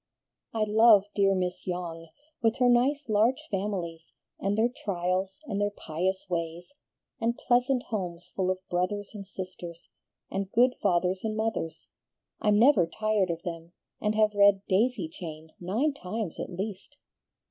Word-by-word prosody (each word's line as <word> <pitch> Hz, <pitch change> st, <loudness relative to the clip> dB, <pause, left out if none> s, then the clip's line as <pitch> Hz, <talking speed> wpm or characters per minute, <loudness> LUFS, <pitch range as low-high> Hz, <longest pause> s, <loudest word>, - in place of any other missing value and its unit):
"I 220 Hz, -1 st, 0 dB
love 215 Hz, -1 st, +6 dB
dear 195 Hz, -1 st, +3 dB
Miss 180 Hz, 0 st, -2 dB
Yonge, 170 Hz, -2 st, -4 dB, 0.3 s
with 225 Hz, +1 st, +2 dB
her 250 Hz, -, +4 dB
nice, 260 Hz, +4 st, +3 dB
large 230 Hz, +7 st, +2 dB
families, 185 Hz, -5 st, -3 dB, 0.3 s
and 200 Hz, +2 st, 0 dB
their 225 Hz, +2 st, +4 dB
trials, 190 Hz, -4 st, -2 dB
and 205 Hz, -6 st, -2 dB
their 205 Hz, -, +2 dB
pious 190 Hz, 0 st, -2 dB
ways, 170 Hz, +4 st, -4 dB, 0.5 s
and 230 Hz, +1 st, 0 dB
pleasant 250 Hz, +1 st, +2 dB
homes 180 Hz, -6 st, -4 dB
full 185 Hz, -1 st, 0 dB
of 185 Hz, 0 st, -3 dB
brothers 190 Hz, +3 st, -1 dB
and 200 Hz, -2 st, -8 dB
sisters, 180 Hz, -3 st, -8 dB, 0.4 s
and 195 Hz, 0 st, -3 dB
good 250 Hz, +2 st, +4 dB
fathers 185 Hz, -1 st, +1 dB
and 220 Hz, -1 st, -2 dB
mothers. 220 Hz, -7 st, -2 dB, 0.6 s
I'm 210 Hz, -1 st, +4 dB
never 225 Hz, -, +6 dB
tired 215 Hz, 0 st, 0 dB
of 170 Hz, 0 st, -3 dB
them, 170 Hz, -1 st, -6 dB, 0.3 s
and 210 Hz, 0 st, +1 dB
have 215 Hz, -1 st, +3 dB
read 200 Hz, -1 st, +5 dB
'Daisy 205 Hz, -1 st, +2 dB
Chain' 160 Hz, -1 st, -9 dB
nine 225 Hz, +12 st, 0 dB
times 215 Hz, -, -4 dB
at -, -, -4 dB
least." 200 Hz, +9 st, -6 dB
195 Hz, 150 wpm, -28 LUFS, 180-220 Hz, 0.6 s, love